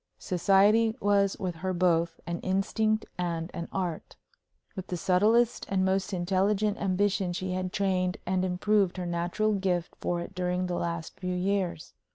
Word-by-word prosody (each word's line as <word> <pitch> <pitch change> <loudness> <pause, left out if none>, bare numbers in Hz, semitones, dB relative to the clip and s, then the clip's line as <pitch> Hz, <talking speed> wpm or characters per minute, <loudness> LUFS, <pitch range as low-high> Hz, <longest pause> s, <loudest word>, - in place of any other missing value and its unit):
Society 205 +5 +3
was 200 -1 +2
with 180 -3 -4
her 185 +2 -2
both 170 -2 +1
an 170 0 -3
instinct 215 +3 0
and 170 -1 -2
an 170 - -5
art. 180 -4 -4 0.6
With 190 -1 -6
the 180 - -3
subtlest 215 +7 +2
and 190 -1 +1
most 190 +2 0
intelligent 195 +3 +1
ambition 195 -1 0
she 185 +1 -3
had 185 0 -2
trained 185 -2 0
and 185 0 0
improved 190 +1 +1
her 180 - -3
natural 175 +5 0
gift 185 -3 -1
for 175 - -1
it 170 - -7
during 180 0 -1
the 180 - -3
last 170 -1 -4
few 180 -1 -2
years. 185 -3 -1
185 Hz, 160 wpm, -28 LUFS, 175-200 Hz, 0.6 s, Society